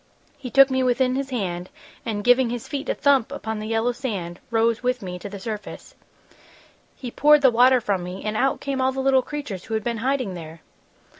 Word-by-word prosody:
He 275 -3 -8
took 275 +1 +6
me 260 0 +1
within 255 0 +2
his 270 +1 -2
hand 185 -7 -3 0.4
and, 205 -2 -2
giving 245 +1 +4
his 240 -1 -5
feet 285 0 -4
a - - 0
thump 275 -3 +2
upon 220 -6 -4
the 215 - -5
yellow 225 +2 +1
sand, 200 -9 -5
rose 230 0 +1
with 250 -2 -1
me 180 -1 -6
to 200 - -7
the 200 0 -8
surface. 210 0 -7 1.0
"He 250 -3 -7
poured 300 +2 +5
the 260 - +6
water 250 +2 +5
from 200 -5 -1
me, 180 +2 -7
and 215 0 -2
out 270 +4 +1
came 275 -1 -2
all 260 0 +2
the 265 - -5
little 265 0 +3
creatures 270 -10 -6
who 225 - -3
had 220 - -2
been 235 0 -2
hiding 255 -3 -1
there!" 165 -2 -9
240 Hz, 215 wpm, -23 LUFS, 205-265 Hz, 1.0 s, took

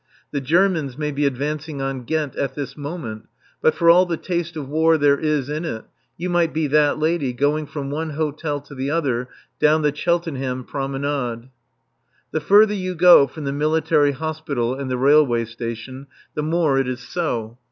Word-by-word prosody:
The 140 - -2
Germans 160 -3 +1
may 150 -1 -2
be 145 0 +1
advancing 145 +2 -3
on 135 -2 -3
Ghent 150 -1 -2
at 135 -1 -2
this 145 -2 -5
moment, 145 -8 -6 0.3
but 155 - +3
for 170 - +1
all 180 +2 +7
the 170 -2 -2
taste 175 -1 -3
of 145 -4 -5
war 160 +3 +3
there 145 -1 +3
is 150 -4 0
in 150 +3 -3
it, 110 -9 -5 0.3
you 175 - -3
might 175 -3 +1
be 160 0 +1
that 150 0 +3
lady, 155 -4 0
going 145 +4 0
from 140 -2 -5
one 160 +2 -3
hotel 150 -1 -2
to 145 0 -14
the 135 0 -3
other, 130 -6 -1 0.3
down 155 +1 +4
the 150 -1 +1
Cheltenham 140 -6 -1
Promenade. 135 -3 -3 0.8
The 155 - -1
further 205 +6 +5
you 185 -2 -3
go 175 -4 +7
from 150 +4 -9
the 140 -1 -2
Military 150 -1 +2
Hospital 145 -5 -2
and 135 0 -5
the 125 - -1
Railway 135 -3 +4
Station 115 +4 -7 0.3
the 150 - -2
more 155 -3 +1
it 135 - 0
is 125 -1 -4
so. 120 -7 -3
145 Hz, 185 wpm, -21 LUFS, 135-160 Hz, 0.8 s, all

